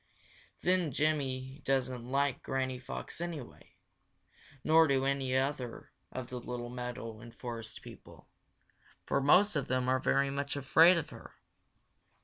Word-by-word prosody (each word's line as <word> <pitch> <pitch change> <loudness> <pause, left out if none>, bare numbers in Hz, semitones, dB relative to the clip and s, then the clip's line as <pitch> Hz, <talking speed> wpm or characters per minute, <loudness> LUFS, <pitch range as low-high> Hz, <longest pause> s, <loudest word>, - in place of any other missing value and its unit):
Then 180 -3 +2
Jimmy 135 -2 -1
doesn't 130 -2 -1
like 140 0 +1
Granny 130 -1 -2
Fox 130 +5 -7
anyway, 165 -8 -7 0.9
nor 160 +1 +6
do 135 -1 +2
any 135 -1 +1
of 140 +3 +1
the 125 -3 -8 0.2
other 125 0 -5
little 120 -1 -5
meadow 125 -2 -6
and 115 +1 -12
forest 115 -3 -6
people, - - -13 0.8
for 140 - +1
most 180 +8 +5
of 145 -3 -1
them 130 0 0
are 130 0 +3
very 135 +1 +2
much 140 +1 -2
afraid 160 +6 +6
of 165 - -3
her. - - -12
135 Hz, 135 wpm, -32 LUFS, 125-145 Hz, 0.9 s, nor